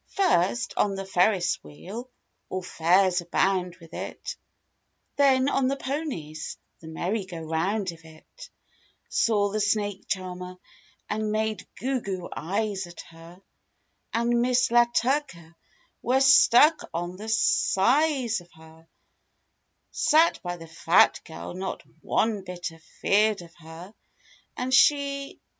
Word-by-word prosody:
First, 235 Hz, -, +1 dB
on 200 Hz, -1 st, +1 dB
the 195 Hz, 0 st, -5 dB
Ferris 190 Hz, 0 st, +1 dB
wheel, 195 Hz, -, -9 dB, 0.4 s
all 185 Hz, 0 st, -4 dB
fairs 180 Hz, +2 st, +2 dB
abound 180 Hz, +1 st, 0 dB
with 165 Hz, -2 st, -16 dB
it; -, -, -6 dB, 0.8 s
Then 270 Hz, -2 st, +4 dB
on 275 Hz, -2 st, +1 dB
the 275 Hz, -, 0 dB
ponies—the 260 Hz, -, -6 dB
merry 185 Hz, +6 st, -2 dB
go 185 Hz, -2 st, -9 dB
round 175 Hz, +5 st, -1 dB
of 165 Hz, -1 st, -15 dB
it; 160 Hz, -1 st, -15 dB, 0.6 s
Saw 205 Hz, -3 st, +2 dB
the 215 Hz, -, -1 dB
snake 205 Hz, -1 st, -1 dB
charmer 180 Hz, -1 st, -4 dB, 0.5 s
and 215 Hz, 0 st, -2 dB
made 215 Hz, 0 st, -2 dB
goo 260 Hz, 0 st, -1 dB
goo 185 Hz, -4 st, -5 dB
eyes 195 Hz, +2 st, -2 dB
at 175 Hz, -, -10 dB
her; 170 Hz, +3 st, -15 dB, 0.7 s
And 235 Hz, +1 st, +1 dB
Miss 250 Hz, -1 st, +2 dB
La 240 Hz, 0 st, +6 dB
Turka—^we're 250 Hz, -, -2 dB
stuck 270 Hz, +3 st, +6 dB
on 175 Hz, +1 st, -3 dB
the 215 Hz, +3 st, -7 dB
size 240 Hz, -, +2 dB
of 175 Hz, -, -20 dB
her; 160 Hz, 0 st, -18 dB, 1.0 s
Sat 325 Hz, +2 st, +3 dB
by 175 Hz, -1 st, -4 dB
the 165 Hz, -, -10 dB
"fat 165 Hz, +2 st, +3 dB
girl" 160 Hz, -, -8 dB
not 190 Hz, +1 st, -5 dB, 0.2 s
one 215 Hz, -3 st, 0 dB
bit 180 Hz, -2 st, -6 dB
"a 165 Hz, -, -16 dB, 0.2 s
feerd" 210 Hz, -1 st, +3 dB
of 170 Hz, -1 st, -15 dB
her; 165 Hz, +5 st, -11 dB, 0.6 s
And 255 Hz, +1 st, -2 dB
she 280 Hz, 0 st, +3 dB
195 Hz, 125 wpm, -26 LUFS, 175-240 Hz, 1.0 s, La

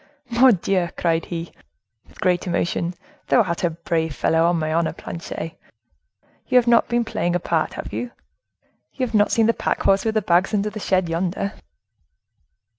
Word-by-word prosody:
"Mordioux!" 195 Hz, -7 st, +3 dB
cried 165 Hz, -1 st, +1 dB
he, 170 Hz, -1 st, -5 dB, 0.6 s
with -, -, -21 dB
great 180 Hz, 0 st, +1 dB
emotion, 175 Hz, 0 st, -1 dB, 0.3 s
"thou 240 Hz, -, +4 dB
art 170 Hz, -2 st, -3 dB
a 175 Hz, -, +3 dB
brave 160 Hz, -2 st, -2 dB
fellow, 165 Hz, +1 st, +2 dB
on 175 Hz, 0 st, +2 dB
my 155 Hz, -1 st, -1 dB
honor, 165 Hz, 0 st, +1 dB
Planchet. 165 Hz, -1 st, -6 dB, 1.0 s
You 255 Hz, -, +4 dB
have 245 Hz, -, +5 dB
not 235 Hz, -1 st, +4 dB
been 240 Hz, -1 st, 0 dB
playing 175 Hz, -5 st, -1 dB
a -, -, +2 dB
part, 165 Hz, -2 st, -1 dB
have -, -, -7 dB
you? 245 Hz, -, -3 dB, 0.8 s
You 260 Hz, -, -1 dB
have 235 Hz, -, -8 dB
not 205 Hz, -1 st, +3 dB
seen 225 Hz, -, +3 dB
the 230 Hz, -, +3 dB
pack -, -, -2 dB
horse 195 Hz, 0 st, +3 dB
with 220 Hz, -1 st, -1 dB
the 215 Hz, -, +1 dB
bags 180 Hz, +4 st, +2 dB
under 210 Hz, +1 st, 0 dB
the 215 Hz, -, -6 dB
shed 185 Hz, -3 st, +1 dB
yonder?" 180 Hz, +4 st, -2 dB
180 Hz, 180 wpm, -22 LUFS, 170-215 Hz, 1.0 s, have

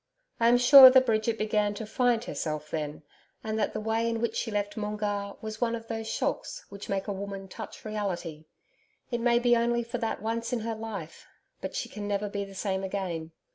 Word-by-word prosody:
I 230 Hz, -, +4 dB
am 240 Hz, +1 st, +6 dB
sure 260 Hz, +2 st, +11 dB
that 260 Hz, 0 st, +5 dB
Bridget 225 Hz, -1 st, +1 dB
began 210 Hz, -1 st, 0 dB
to 220 Hz, -, -5 dB
'find 240 Hz, +1 st, +1 dB
herself' 155 Hz, -8 st, -4 dB
then, 150 Hz, 0 st, -4 dB, 0.4 s
and 220 Hz, 0 st, -2 dB
that 210 Hz, -, 0 dB
the 215 Hz, -, -2 dB
way 225 Hz, +2 st, 0 dB
in 230 Hz, -1 st, -1 dB
which 230 Hz, -1 st, -1 dB
she 230 Hz, -, -2 dB
left 205 Hz, -1 st, -2 dB
Moongarr 210 Hz, -2 st, -3 dB
was 220 Hz, +1 st, -6 dB
one 235 Hz, -1 st, +1 dB
of 230 Hz, -1 st, -9 dB
those 225 Hz, -1 st, -4 dB
shocks -, -, -3 dB
which 200 Hz, 0 st, -9 dB
make 195 Hz, 0 st, -1 dB
a 205 Hz, -, -1 dB
woman 195 Hz, 0 st, -6 dB
touch 190 Hz, -, -9 dB
reality. 180 Hz, -7 st, -4 dB, 0.7 s
It 240 Hz, -1 st, -1 dB
may 235 Hz, 0 st, +4 dB
be 240 Hz, 0 st, +4 dB
only 235 Hz, 0 st, +1 dB
for 235 Hz, +1 st, -5 dB
that 225 Hz, -1 st, -2 dB
once 230 Hz, +3 st, -2 dB
in 240 Hz, -, 0 dB
her 225 Hz, +1 st, -2 dB
life, 215 Hz, -7 st, -7 dB, 0.3 s
but -, -, -5 dB
she -, -, -2 dB
can 205 Hz, -1 st, -6 dB
never 205 Hz, 0 st, -1 dB
be 200 Hz, 0 st, -3 dB
the 195 Hz, -1 st, -10 dB
same 190 Hz, -1 st, -2 dB
again. 180 Hz, -4 st, -3 dB
215 Hz, 215 wpm, -28 LUFS, 200-230 Hz, 0.7 s, sure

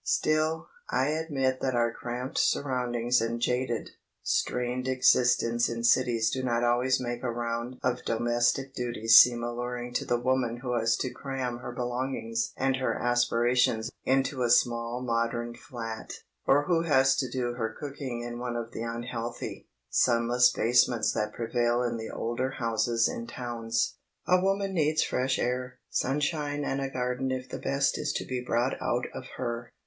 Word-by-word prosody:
Still, 155 Hz, +1 st, +1 dB, 0.2 s
I 130 Hz, +3 st, +1 dB
admit 140 Hz, -5 st, 0 dB
that 130 Hz, -2 st, 0 dB
our 115 Hz, -1 st, +2 dB
cramped 125 Hz, +2 st, -4 dB
surroundings 125 Hz, -3 st, +1 dB
and 115 Hz, +1 st, -1 dB
jaded, 125 Hz, -1 st, -1 dB, 0.3 s
strained 125 Hz, +1 st, -1 dB
existence 125 Hz, -2 st, +3 dB
in 115 Hz, 0 st, -4 dB
cities 120 Hz, -2 st, +3 dB
do 130 Hz, -, -2 dB
not 120 Hz, -2 st, 0 dB
always 125 Hz, +2 st, +2 dB
make 120 Hz, -1 st, -4 dB
a 125 Hz, -, -2 dB
round 120 Hz, +1 st, -3 dB
of 125 Hz, 0 st, 0 dB
domestic 120 Hz, +3 st, +1 dB
duties 115 Hz, -3 st, +5 dB
seem 120 Hz, -1 st, +5 dB
alluring 120 Hz, +1 st, -4 dB
to -, -, -1 dB
the 120 Hz, -, +1 dB
woman 120 Hz, -1 st, 0 dB
who 125 Hz, -1 st, -2 dB
has 115 Hz, 0 st, +2 dB
to 130 Hz, -, -2 dB
cram 130 Hz, -3 st, -4 dB
her 120 Hz, -, -6 dB
belongings 120 Hz, -2 st, -2 dB
and 135 Hz, 0 st, +1 dB
her 130 Hz, -, 0 dB
aspirations 120 Hz, -1 st, +2 dB
into 135 Hz, 0 st, +1 dB
a 120 Hz, -, +2 dB
small 120 Hz, 0 st, +2 dB
modern 120 Hz, 0 st, -1 dB
flat, 115 Hz, -5 st, -7 dB, 0.4 s
or 145 Hz, +2 st, +5 dB
who 165 Hz, +1 st, +2 dB
has 135 Hz, -5 st, +4 dB
to 130 Hz, -, -1 dB
do 120 Hz, -1 st, -2 dB
her 115 Hz, -2 st, -2 dB
cooking 135 Hz, -2 st, -6 dB
in 120 Hz, 0 st, -5 dB
one 120 Hz, -1 st, -3 dB
of 120 Hz, 0 st, -4 dB
the 115 Hz, -, -6 dB
unhealthy, 120 Hz, 0 st, -5 dB, 0.2 s
sunless 120 Hz, +1 st, +4 dB
basements 120 Hz, -1 st, +3 dB
that 105 Hz, -1 st, -1 dB
prevail 120 Hz, +1 st, 0 dB
in 120 Hz, -1 st, -1 dB
the 110 Hz, 0 st, -6 dB
older 120 Hz, +3 st, -2 dB
houses 115 Hz, -2 st, +1 dB
in 115 Hz, -, -5 dB
towns. 115 Hz, -2 st, -2 dB, 0.3 s
A 180 Hz, 0 st, +4 dB
woman 195 Hz, 0 st, 0 dB
needs 155 Hz, -2 st, +2 dB
fresh 130 Hz, +1 st, 0 dB
air, 125 Hz, +1 st, -2 dB
sunshine 145 Hz, +1 st, -1 dB
and 135 Hz, +1 st, -1 dB
a 135 Hz, -, -2 dB
garden 125 Hz, 0 st, -2 dB
if 130 Hz, 0 st, -3 dB
the -, -, -6 dB
best 140 Hz, 0 st, 0 dB
is -, -, -1 dB
to -, -, -3 dB
be 130 Hz, -1 st, -3 dB
brought 120 Hz, +2 st, +1 dB
out 120 Hz, +1 st, 0 dB
of -, -, -7 dB
her. 120 Hz, -1 st, -4 dB
125 Hz, 165 wpm, -28 LUFS, 120-130 Hz, 0.4 s, duties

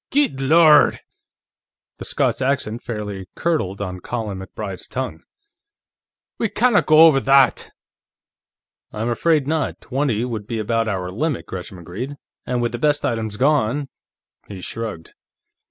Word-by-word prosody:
"Guid 280 Hz, -, +2 dB
Lorrd!" 150 Hz, +2 st, +6 dB, 1.0 s
The -, -, -6 dB
Scots -, -, 0 dB
accent 130 Hz, -4 st, -1 dB
fairly 105 Hz, -5 st, -5 dB
curdled 100 Hz, -, -1 dB
on 90 Hz, -2 st, -4 dB
Colin 105 Hz, -2 st, -4 dB
MacBride's 95 Hz, 0 st, -6 dB
tongue. 130 Hz, 0 st, -4 dB, 1.2 s
"We 225 Hz, -, 0 dB
canna 235 Hz, -1 st, +3 dB
go 155 Hz, 0 st, +5 dB
over 150 Hz, -4 st, +6 dB
that!" 135 Hz, -2 st, +3 dB, 1.2 s
"I'm 110 Hz, +2 st, -3 dB
afraid 150 Hz, +4 st, +2 dB
not; 155 Hz, -1 st, -1 dB
twenty 130 Hz, -4 st, -1 dB
would 110 Hz, -4 st, -5 dB
be 115 Hz, -, -3 dB
about 115 Hz, +1 st, 0 dB
our 95 Hz, -3 st, -2 dB
limit," 145 Hz, -, -2 dB
Gresham 95 Hz, 0 st, -7 dB
agreed. 100 Hz, -, -6 dB, 0.3 s
"And 125 Hz, -1 st, 0 dB
with 120 Hz, -, 0 dB
the 120 Hz, -, -5 dB
best 145 Hz, +1 st, +1 dB
items 110 Hz, -2 st, -2 dB
gone 140 Hz, 0 st, +1 dB, 0.3 s
..." -, -, -42 dB
He 100 Hz, -2 st, -7 dB
shrugged. 105 Hz, -6 st, -6 dB
120 Hz, 140 wpm, -21 LUFS, 105-145 Hz, 1.2 s, Lorrd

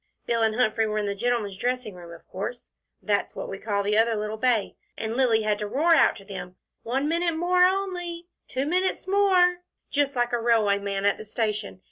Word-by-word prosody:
Bill 230 Hz, -1 st, 0 dB
and 220 Hz, -1 st, +2 dB
Humphrey 225 Hz, -2 st, +2 dB
were 215 Hz, 0 st, -2 dB
in 210 Hz, -, 0 dB
the 200 Hz, -, -1 dB
gentlemen's 220 Hz, -2 st, -1 dB
dressing 245 Hz, -1 st, -2 dB
room, 175 Hz, -1 st, -11 dB
of 170 Hz, -, -13 dB
course 205 Hz, +6 st, -5 dB, 0.4 s
that's 205 Hz, -2 st, 0 dB
what -, -, -5 dB
we 195 Hz, -, -6 dB
call 205 Hz, -2 st, -1 dB
the 210 Hz, +2 st, +2 dB
other 225 Hz, 0 st, +3 dB
little 210 Hz, 0 st, -3 dB
bay 225 Hz, -2 st, +1 dB, 0.2 s
and 220 Hz, 0 st, -3 dB
Lilly 235 Hz, -4 st, +3 dB
had 210 Hz, -1 st, 0 dB
to 210 Hz, -, -3 dB
roar 310 Hz, +10 st, +3 dB
out 310 Hz, -, +5 dB
to 195 Hz, -, -13 dB
them, 180 Hz, -2 st, -8 dB, 0.3 s
'one 265 Hz, +5 st, -1 dB
minute 335 Hz, +1 st, 0 dB
more 360 Hz, +2 st, +4 dB
only,' 355 Hz, -3 st, -2 dB, 0.2 s
'two 265 Hz, +1 st, -2 dB
minutes 365 Hz, +5 st, 0 dB
more,' 375 Hz, -3 st, +4 dB, 0.3 s
just 285 Hz, -1 st, +1 dB
like 240 Hz, 0 st, 0 dB
a 240 Hz, -, +2 dB
railway 220 Hz, -4 st, +3 dB
man 200 Hz, 0 st, -3 dB
at 205 Hz, -, +2 dB
a -, -, -6 dB
station. 210 Hz, -3 st, -3 dB
230 Hz, 210 wpm, -25 LUFS, 205-295 Hz, 0.4 s, out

